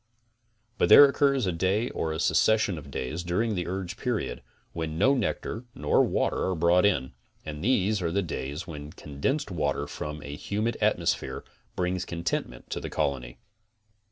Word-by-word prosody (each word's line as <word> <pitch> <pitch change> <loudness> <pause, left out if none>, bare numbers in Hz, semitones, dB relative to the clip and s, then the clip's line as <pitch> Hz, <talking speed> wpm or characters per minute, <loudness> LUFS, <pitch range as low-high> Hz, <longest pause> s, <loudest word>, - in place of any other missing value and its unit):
But - - +3
there 145 - +11
occurs 140 -2 +2
a 90 - +1
day 95 +8 0
or 80 - -2
a 80 - -3
succession 110 -6 +3
of 70 -1 -12
days, 70 +5 -3
during 95 +6 0
the 90 -3 -2
urge 95 +1 -4
period, 120 -4 -2 0.3
when 80 -1 -4
no 135 +10 +4
nectar 120 -1 -2
nor 75 0 +3
water - - 0
are 95 - 0
brought 85 +4 +4
in, 65 -10 0 0.3
and 75 +1 -6
these 105 -3 +2
are 85 -2 -1
the 100 +3 +1
days 75 0 -4
when 75 -3 -8
condensed 100 - -2
water 75 -5 -1
from 75 0 -6
a 70 0 -6
humid 105 +8 -2
atmosphere - - 0 0.3
brings 90 0 -1
contentment 85 -8 -4
to - - -2
the - - -6
colony. 60 -4 -2
90 Hz, 165 wpm, -27 LUFS, 75-105 Hz, 0.3 s, there